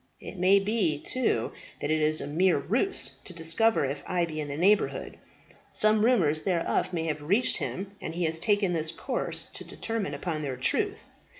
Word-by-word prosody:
It - - -9
may 185 +2 +5
be, 195 -6 0
too, 225 - 0 0.3
that 145 - -2
it 155 0 +2
is 155 +1 +3
a - - -4
mere 175 +4 +2
ruse 245 - 0
to 180 - -8
discover 165 +4 +2
if 140 +2 -3
I 175 -1 +1
be 155 -2 -5
in 150 - -4
the 140 0 -5
neighbourhood. 195 +5 +1 0.5
Some 215 0 +3
rumours 170 -11 +3
thereof 175 -2 0
may 170 -3 -2
have 150 -2 -2
reached 200 +12 +2
him, 195 +1 -4
and 165 - -5
he 175 - -1
has 160 0 +1
taken 205 -2 +2
this 160 -1 0
course - - -3
to - - -7
determine 220 -10 -4
upon 155 +1 -3
their 135 -4 -3
truth. 130 - +1
170 Hz, 190 wpm, -28 LUFS, 155-205 Hz, 0.5 s, may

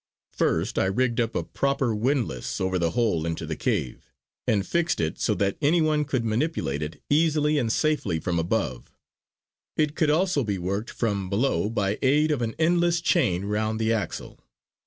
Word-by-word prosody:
First - - 0
I - - +2
rigged 120 +5 0
up 115 -1 -2
a - - 0
proper 140 -4 0
windlass 115 - -1
over 95 0 0
the 85 -1 +1
hole 105 -10 +2
into 80 0 -3
the - - -3
cave; - - -2 0.4
and 100 -2 +2
fixed 170 -1 0
it 80 -1 -2
so - - +1
that 100 -1 0
any 155 +4 +3
one 155 -2 +2
could 130 -5 -1
manipulate 110 - -1
it 75 +1 -5
easily 150 0 +2
and 115 -4 0
safely 140 - 0
from 85 +1 -1
above. 80 - -2 0.9
It 150 -1 +1
could 155 - +2
be - - +4
also 175 -3 +2
worked 100 +1 -2
from 100 -5 -2
below 105 +1 +1
by 105 -2 -1
aid 150 +4 +3
of 145 -5 0
an 115 -1 -2
endless 170 +1 +2
chain 120 - +1
round 110 +2 -1
the 110 0 +2
axle. 110 -3 -4
115 Hz, 180 wpm, -25 LUFS, 95-150 Hz, 0.9 s, be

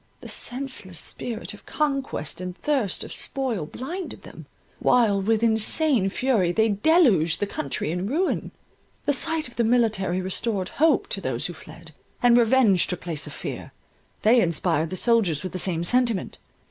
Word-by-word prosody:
The - - -9
senseless 245 -9 -5
spirit 230 -2 -2
of 210 - -15
conquest 275 - -2
and 180 0 -6
thirst 265 -10 0
of - - -8
spoil 245 - -1
blinded 345 - -7
them, - - -12 0.3
while 220 -5 +3
with 220 +3 +1
insane 225 0 +3
fury 210 -5 +1
they 220 +4 +2
deluged 210 - +3
the 205 - 0
country 150 -5 -4
in 180 +3 -2
ruin. 330 - -1 0.6
The 290 - +2
sight 320 +2 -2
of 235 - -16
the 235 - +2
military 220 -6 +1
restored 190 +1 -2
hope 310 -1 +2
to 195 - -3
those 130 -7 -2
who 175 - -3
fled, 160 +1 -12 0.3
and 240 -1 +6
revenge 230 -5 +4
took 180 - -3
place 165 -4 -2
of - - -8
fear. - - -7 0.5
They 235 +3 +5
inspired 165 -2 0
the 185 - -4
soldiers 200 - +2
with 185 - -4
the 185 - -4
same 175 -2 -1
sentiment. 235 +1 0
220 Hz, 165 wpm, -24 LUFS, 180-255 Hz, 0.6 s, and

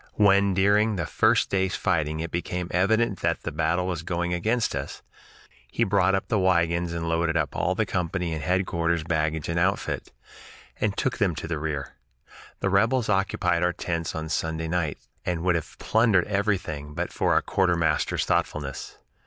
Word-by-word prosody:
When 100 -2 +4
during 105 +3 +3
the 85 -4 -2
first - - +2
day's 95 -1 +1
fighting 80 -2 0
it 85 0 -5
became 90 0 -3
evident 100 +2 +2
that 85 -2 -1
the 85 - -3
battle 80 +4 0
was 90 -4 -2
going 85 0 -2
against 110 +7 0
us, - - -5 0.7
he 115 - +1
brought 95 -2 +3
up 95 - -2
the 105 - +1
wagons 85 -2 +2
and 85 -1 -3
loaded 80 0 +1
up 75 -4 -1
all - - 0
the - - +1
company 90 -1 -2
and 80 - -4
headquarters 85 -2 0
baggage 80 -1 -1
and 85 +1 -1
outfit, 95 +3 -1 0.7
and 100 -2 -1
took 130 - -1
them 90 -5 +2
to 80 - -5
the 80 -2 -2
rear. 75 -4 -4 0.6
The 95 - +1
rebels 110 +4 +2
occupied 95 -3 +1
our 90 0 +2
tents 85 -2 -3
on 80 0 -4
Sunday 80 0 -2
night, 80 -3 -1 0.3
and 85 -2 -2
would 90 -1 +3
have 85 -3 -4
plundered 110 -5 +3
everything 95 -8 -2
but 85 +1 -3
for - - +1
our - - +4
quartermaster's 85 -5 +1
thoughtfulness. 70 -3 -2
85 Hz, 175 wpm, -26 LUFS, 80-95 Hz, 0.7 s, When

